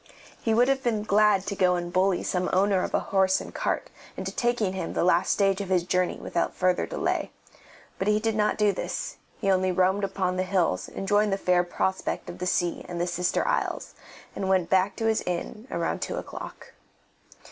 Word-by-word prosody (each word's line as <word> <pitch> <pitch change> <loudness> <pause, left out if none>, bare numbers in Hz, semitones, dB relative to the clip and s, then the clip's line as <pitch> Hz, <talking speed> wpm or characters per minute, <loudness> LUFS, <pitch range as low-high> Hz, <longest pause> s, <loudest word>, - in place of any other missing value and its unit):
He 225 -1 +1
would 245 +2 +4
have 270 0 +1
been 220 -4 0
glad 210 -2 +3
to 200 - -3
go 180 -1 +3
and 175 0 -4
bully 185 0 +2
some 180 0 -1
owner 195 0 +3
of - - -2
a - - +3
horse 190 -1 +3
and - - -9
cart - - -2 0.3
into - - -4
taking 240 -5 0
him 190 - -4
the - - 0
last 175 0 +3
stage 195 -1 +2
of 195 - -5
his 180 -2 +2
journey 180 0 0
without 170 - -2
further 180 -1 +1
delay; - - -1 0.7
but 190 - -1
he 210 0 +3
did 225 0 -1
not 210 -1 +1
do 210 -1 +3
this, 190 - -4 0.2
he 195 -3 +1
only 185 0 +2
roamed 185 +2 +2
upon 185 -2 -1
the - - +1
hills 185 -2 0
enjoying 205 +2 +1
the 195 - 0
fair 180 -2 +2
prospect 190 +2 -2
of - - -12
the 180 - -2
sea 175 -1 0
and 175 -1 -4
the 175 - +1
sister 175 0 0
isles, - - -1 0.4
and 190 - -2
went 185 -3 +2
back 190 +1 +3
to 225 - -3
his 220 -1 +2
inn 180 +6 -4
about - - -2
two - - -3
o'clock. - - -8
190 Hz, 205 wpm, -26 LUFS, 180-210 Hz, 0.7 s, would